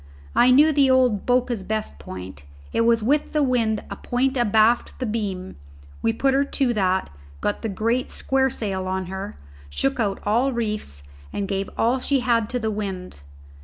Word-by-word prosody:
I 245 - +6
knew 290 +5 +6
the 275 -2 +4
old 250 -6 +3
Boca's 245 -3 +1
best 215 - -4
point; 90 -2 -9 0.3
it - - +2
was 230 -1 +3
with 290 +6 +1
the 300 -1 +2
wind 230 -5 +1
a - - -3
point 260 +2 -1
abaft 230 -1 +3
the 255 - -3
beam; 200 -5 -3 0.4
we 225 - +2
put 270 +4 +1
her 275 +1 +3
to 270 -3 0
that, 190 - 0 0.3
got 205 - -2
the 225 - -2
great 230 +5 0
square 265 0 +1
sail 195 -6 -3
on 190 0 -2
her, 190 - -5 0.3
shook 270 - -1
out 205 -4 0
all 240 +6 +2
reefs, 210 - -3 0.3
and 200 - -3
gave 195 0 -2
all 240 +3 +2
she 275 +1 +1
had 230 -3 +1
to 250 - -1
the 220 -2 -1
wind. 190 - -5
225 Hz, 180 wpm, -23 LUFS, 195-255 Hz, 0.4 s, I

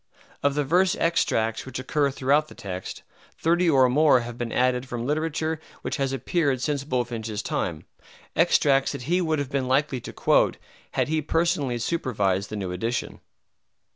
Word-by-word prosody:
Of 140 0 +1
the 145 - +1
verse 180 +6 +3
extracts 115 -9 +1
which 130 -2 -7
occur 140 +2 0
throughout 140 +3 +1
the - - -14
text, 95 -2 -6 0.3
thirty 170 +2 +2
or 135 -4 +5
more 140 0 +4
have 120 0 -7
been 120 -1 -4
added 125 0 +1
from 120 -1 -4
literature 155 +2 -1 0.2
which - - -2
has 135 -2 0
appeared 140 -1 0
since 140 +1 -1
Bulfinch's 115 -5 -3
time, 80 -4 -3 0.5
extracts 135 -2 +3
that - - -6
he 175 +7 +1
would 160 -2 0
have 145 -1 -3
been 135 -2 -1
likely 130 -1 +1
to - - -8
quote - - +2 0.4
had - - +1
he 155 +1 0
personally 155 -5 0
supervised 105 - -1
the - - -5
new 95 -3 -3
edition. 115 +7 -3
135 Hz, 170 wpm, -25 LUFS, 120-155 Hz, 0.5 s, or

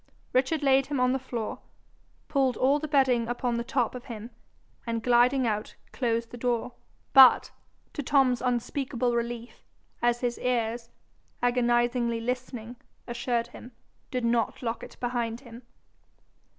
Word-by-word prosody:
Richard 275 +4 +1
laid 270 -1 +4
him 285 -2 -2
on 250 0 +3
the 265 - 0
floor, 240 -4 -5 0.7
pulled 270 -3 +1
all 275 +3 +3
the 310 - -4
bedding 260 -5 +3
upon 245 0 -1
the 235 - -2
top 240 -1 0
of 250 0 -8
him, 230 -1 -8 0.6
and 230 -1 -2
gliding 250 +2 +4
out, 215 -1 -2 0.2
closed 230 -2 -1
the 245 - -9
door, 245 0 -1 0.4
but, 265 -3 +8 0.4
to 295 - -3
Tom's 265 -3 +3
unspeakable 245 0 -1
relief, 235 0 -4 0.4
as 240 0 +2
his 240 -1 -1
ears, 235 -1 -1 0.5
agonizedly 240 -1 +2
listening, 245 -1 -4 0.3
assured 240 0 -2
him, 245 0 -12 0.4
did 250 -2 -2
not 235 0 0
lock 230 0 -2
it - - -11
behind 240 -1 -2
him. 235 -2 -12
245 Hz, 140 wpm, -27 LUFS, 235-255 Hz, 0.7 s, but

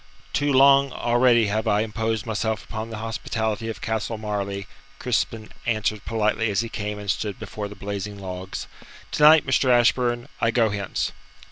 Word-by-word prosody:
"Too 145 0 +1
long 140 0 +6
already 120 -1 +3
have 105 +1 -1
I 105 +1 +3
imposed 110 0 -2
myself 110 -1 -2
upon 110 0 -6
the 110 - -6
hospitality 110 0 -3
of 105 -4 -6
Castle 110 0 -2
Marleigh," 100 -2 -3 0.3
Crispin 110 -1 -2 0.2
answered 110 -2 -1
politely 110 0 0
as 100 +1 +1
he 115 - -5
came 105 -1 -4
and 105 -1 -1
stood 105 -3 -3
before 105 -1 -6
the 105 - -10
blazing 100 0 -5
logs. 95 -1 -6 0.5
"To - - -2
night, 155 +1 +8
Mr. 130 0 +2
Ashburn, 120 0 +3
I 115 - +2
go 115 -2 +2
hence." 100 -1 -2
110 Hz, 165 wpm, -24 LUFS, 105-120 Hz, 0.5 s, night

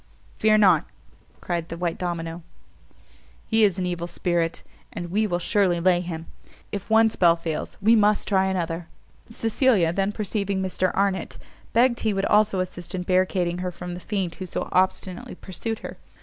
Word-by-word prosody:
"Fear 215 0 +5
not," 200 -3 +5 0.6
cried 170 -2 -3
the 165 - -5
white 170 -1 -2
domino, 170 -1 -3 1.0
"he 225 -1 +3
is 200 -3 +3
an 185 - -1
evil 175 -1 -3
spirit, 170 -1 -1 0.3
and 175 0 -6
we 215 +3 +2
will 175 -3 0
surely 180 0 +1
lay 175 0 +3
him. 165 -2 -6 0.5
If 200 +1 -5
one 225 0 +5
spell 170 -4 +4
fails, 165 -2 -5
we 225 +3 +6
must 210 -1 +3
try 190 -1 +3
another." 170 -3 -2 0.4
Cecilia 225 -6 +2
then 195 +2 0
perceiving 200 -2 -2
Mr 185 0 0
Arnott, 195 -2 0 0.3
begged 240 +1 +3
he 215 -3 0
would 195 0 0
also 210 -2 +3
assist 180 0 -5
in 180 - -3
barricading 180 -1 +1
her 180 0 -2
from 180 0 -7
the 175 - -6
fiend 190 -3 -2
who 185 - -4
so - - -4
obstinately 185 0 0
pursued 220 +5 -5
her. - - -7
185 Hz, 170 wpm, -24 LUFS, 175-205 Hz, 1.0 s, we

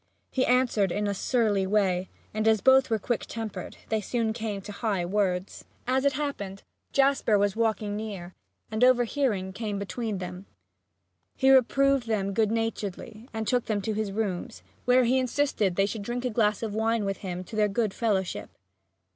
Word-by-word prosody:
He 260 - +1
answered 245 -6 +3
in 210 +2 -1
a 200 - 0
surly 205 -2 +1
way 190 -3 +1 0.2
and, 215 +1 0
as 220 -1 +5
both 265 +5 +5
were 225 - +2
quick 230 +2 -2
tempered, 225 -2 -6
they 220 -1 +1
soon 225 +1 -1
came 220 -3 -3
to 205 - -8
high 200 -4 -1
words. 185 -1 -1 0.2
As 260 +2 +1
it 280 - +4
happened, 205 -10 -4 0.3
Jasper 275 -6 +3
was 200 -1 +1
walking 215 -2 0
near, 200 -5 -6 0.4
and, 220 +2 0
overhearing, 245 -6 +2
came 210 -1 -3
between 210 +1 -3
them. 180 +1 -7 0.9
He 265 0 +4
reproved 270 0 +4
them 200 -3 0
good 215 +1 +2
naturedly 225 0 -3
and 220 -1 -4
took 250 -2 +1
them 215 -2 0
to 220 - -1
his 210 -1 -2
rooms, 210 +1 -3 0.2
where 250 +1 +5
he 250 +2 +3
insisted 255 -7 0
they 195 - +3
should 210 +1 -4
drink 240 +4 -3
a 250 - 0
glass 210 -1 +1
of 215 -2 -3
wine 220 0 +1
with 195 0 -2
him 180 -2 -5
to 220 - -10
their 210 -1 +3
good 210 -1 0
fellowship. 200 -5 -1
215 Hz, 180 wpm, -27 LUFS, 200-240 Hz, 0.9 s, as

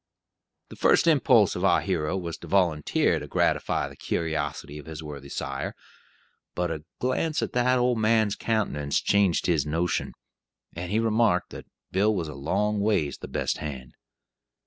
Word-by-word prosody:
The - - -10
first - - +4
impulse 130 - +4
of 90 - -3
our 95 -3 +4
hero 90 -2 -1
was 85 -3 -4
to 85 - -10
volunteer 85 -4 +2
to - - -8
gratify - - +1
the - - -12
curiosity 75 -2 -3
of 75 - -12
his 80 0 -7
worthy 70 -2 -8
sire, 70 0 -4 0.8
but 90 -1 -1
a 80 -1 -5
glance 150 +5 0
at - - -4
the 125 +1 +3
old 125 -1 +2
man's 110 -1 +2
countenance 80 -11 0
changed 100 -4 +2
his 80 -6 +2
"notion," 85 +3 -1 0.6
and 90 +2 -5
he 110 - +2
remarked 110 -5 +2
that - - -9 0.2
"Bill 105 +3 +2
was 85 -4 -2
a 75 - -7
long 100 +10 -1
ways 100 -9 0
the - - -7
best - - -2
hand." 65 -5 -6
90 Hz, 165 wpm, -26 LUFS, 75-110 Hz, 0.8 s, first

